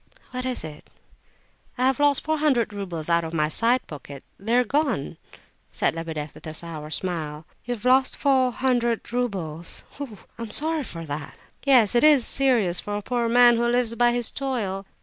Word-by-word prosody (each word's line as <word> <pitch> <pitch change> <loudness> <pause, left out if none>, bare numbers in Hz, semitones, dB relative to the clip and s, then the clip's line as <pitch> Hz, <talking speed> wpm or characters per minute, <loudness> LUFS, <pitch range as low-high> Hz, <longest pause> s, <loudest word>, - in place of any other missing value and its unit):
"What 255 0 -4
is 250 -8 -3
it?" 155 -2 -10 0.9
"I 250 - +1
have 265 +1 +2
lost 290 -1 +4
four 315 0 -1
hundred 260 -8 +1
roubles 180 -6 -5
out 170 0 +2
of 165 +1 -5
my 150 -1 +1
side 235 +9 +2
pocket! 140 -2 -10 0.2
They're 230 +5 +2
gone!" 245 - -1 0.5
said - - +1
Lebedeff, 160 -2 -5
with - - -11
a 155 - -6
sour 155 -2 -6
smile. 155 -3 -4 0.2
"You've 240 -2 -5
lost 260 +1 +3
four 260 -2 +2
hundred 240 -2 -1
roubles? 180 -10 -3 0.2
Oh! 255 -8 -7 0.2
I'm 230 -1 -5
sorry 315 +7 +2
for 165 -1 -7
that." 145 0 -6 0.3
"Yes, 245 -7 +5
it 240 - +3
is 295 -5 +6
serious 235 -10 +3
for 205 0 -4
a 205 - -6
poor 240 +1 -1
man 240 0 +6
who 235 +1 +1
lives 240 -1 +1
by 240 +1 +3
his 240 -1 0
toil." 210 -8 -3
230 Hz, 180 wpm, -24 LUFS, 170-255 Hz, 0.9 s, is